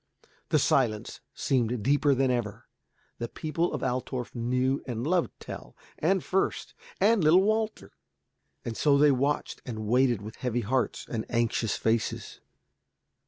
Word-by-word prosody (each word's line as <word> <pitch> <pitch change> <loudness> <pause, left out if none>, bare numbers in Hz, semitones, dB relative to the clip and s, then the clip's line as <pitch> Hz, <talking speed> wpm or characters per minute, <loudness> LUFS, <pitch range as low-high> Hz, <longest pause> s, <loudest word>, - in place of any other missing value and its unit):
The - - +4
silence 110 -5 +1
seemed 120 -4 0
deeper 145 +2 +3
than 130 0 +2
ever. 115 -4 -3 0.5
The 120 - -2
people 165 +5 -2
of 150 - -4
Altorf 125 -1 -3
knew 125 +3 0
and 120 -1 -3
loved 175 +2 +2
Tell, - - -9 0.2
and 190 +4 +2
Fürst, 190 +1 -1 0.3
and 215 -2 +4
little 170 +5 +6
Walter. 215 +1 -1 0.7
And 115 - -4
so 145 +2 +3
they 145 0 +6
watched 140 +3 -1
and 110 -4 -5
waited 120 -1 +2
with 110 +2 -9
heavy 120 -1 -1
hearts 125 +3 -1
and 110 -2 -3
anxious 115 -2 0
faces. 115 0 -1
130 Hz, 140 wpm, -28 LUFS, 115-150 Hz, 0.7 s, little